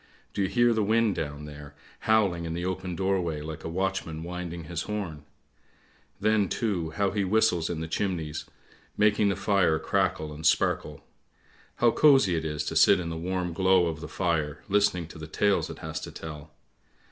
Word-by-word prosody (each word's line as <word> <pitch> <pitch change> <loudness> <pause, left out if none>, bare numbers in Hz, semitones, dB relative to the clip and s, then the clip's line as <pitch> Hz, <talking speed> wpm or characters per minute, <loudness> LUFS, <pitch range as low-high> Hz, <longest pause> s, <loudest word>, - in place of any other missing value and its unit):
Do - - -1
you 95 - +2
hear 120 +3 +3
the 110 - +1
wind 110 0 +2
down 75 -2 -5
there, 75 -1 -10 0.3
howling 95 -6 +3
in 80 0 -3
the 85 +1 -3
open 95 -1 -3
doorway 90 -5 0
like 80 +1 -7
a - - -4
watchman 90 -3 -2
winding 85 -1 -5
his 80 +1 -4
horn? 95 -8 -4 0.9
Then, 110 -3 +2
too, 95 -8 -1
how 100 +4 0
he 100 0 0
whistles 95 -4 +2
in 85 -2 -3
the 80 - -4
chimneys, 80 -4 -2 0.5
making 105 0 +3
the 100 - 0
fire 100 -5 +2
crackle 80 -1 -1
and 75 +1 -9
sparkle. - - +1 0.7
How 120 -1 +4
cosy 135 - +5
it 80 -1 -2
is 75 -1 -2
to - - -3
sit - - +6
in 85 -2 -4
the 80 - -4
warm 90 +1 -2
glow 95 0 +4
of 80 -2 -3
the 75 - -6
fire 80 -3 -1
listening 100 -4 +2
to 80 - -11
the 80 - -7
tales 100 +5 +1
it - - -7
has - - -4
to - - -8
tell! 75 -1 -9
90 Hz, 185 wpm, -27 LUFS, 80-100 Hz, 0.9 s, sit